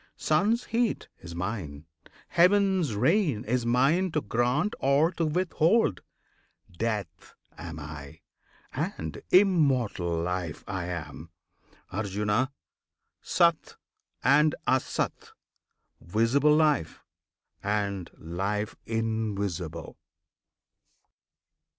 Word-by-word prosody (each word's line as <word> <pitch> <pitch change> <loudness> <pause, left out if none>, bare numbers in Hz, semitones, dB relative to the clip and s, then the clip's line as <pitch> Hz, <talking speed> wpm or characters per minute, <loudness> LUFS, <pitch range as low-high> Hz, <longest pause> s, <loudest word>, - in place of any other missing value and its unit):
Sun's 230 +4 +2
heat 230 0 -1
is 85 0 -9
mine; 85 -6 -4 0.4
Heaven's 185 - +3
rain 135 - +2
is 120 0 0
mine 150 +10 +3
to 155 - +1
grant 125 - 0
or 140 +5 +3
to 165 -3 -1
withhold; 165 - +2 0.7
Death 105 -5 -4 0.2
am 80 -2 -8
I, 75 -2 -9 0.5
and 80 -1 -4
Immortal 140 - +3
Life 90 -3 -3
I 95 -4 -3
am, 85 -2 -6 0.6
Arjuna! 105 +5 0 0.7
SAT 170 -3 +2 0.5
and 150 +4 +4
ASAT, 130 - -1 0.7
Visible 115 +10 +3
Life, 150 - +1 0.6
And 100 -3 -2
Life 100 +6 -3
Invisible! 100 -7 -3
115 Hz, 85 wpm, -28 LUFS, -, 0.7 s, and